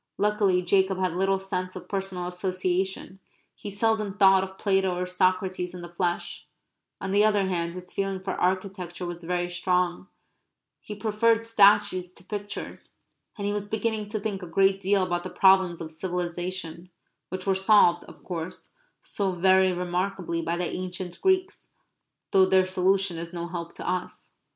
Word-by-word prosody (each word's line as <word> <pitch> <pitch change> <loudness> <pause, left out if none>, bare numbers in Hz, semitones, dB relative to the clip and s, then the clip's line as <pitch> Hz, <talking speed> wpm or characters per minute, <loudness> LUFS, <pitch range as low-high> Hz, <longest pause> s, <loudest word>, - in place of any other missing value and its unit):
Luckily 205 -3 +2
Jacob 190 +1 +2
had 185 -2 0
little 195 +2 +1
sense 185 -1 -4
of 180 -1 -8
personal 190 -2 -3
association; 185 +1 -2 0.3
he 205 - -8
seldom 210 -1 0
thought 195 -2 +6
of 190 0 -8
Plato 190 -2 +1
or 180 - -1
Socrates 185 0 0
in 180 - -7
the 175 0 -10
flesh; 175 0 -2 0.5
on 190 - -4
the 205 +1 +4
other 210 -2 +3
hand 170 -2 -2
his 180 0 -9
feeling 195 -1 -2
for 190 0 -4
architecture 185 -1 -2
was 175 0 -6
very 175 +1 -1
strong; 180 0 0 0.7
he 210 - -8
preferred 225 +2 +2
statues 205 -4 +4
to - - -13
pictures; 205 +1 -7 0.4
and 200 - -4
he 205 - 0
was 205 0 -3
beginning 220 0 -1
to 215 0 -2
think 200 -2 -3
a 180 - -7
great 195 +3 +3
deal 195 0 +2
about 175 -1 -1
the 185 - -5
problems 190 -3 +4
of 160 -1 -6
civilization, 175 0 -4 0.4
which 185 +1 -5
were 195 - +3
solved, 190 -3 +4
of - - -15
course, 175 0 -6 0.3
so 195 -2 -2
very 190 +1 +4
remarkably 180 -1 -2
by 170 +1 -2
the 175 0 -1
ancient 180 -1 -5
Greeks, 375 -1 0 0.6
though 190 -1 +5
their 190 0 +4
solution 185 -1 +1
is 170 +1 -7
no 170 0 -4
help 170 -1 -6
to - - -7
us. 180 0 -4
185 Hz, 165 wpm, -26 LUFS, 180-195 Hz, 0.7 s, thought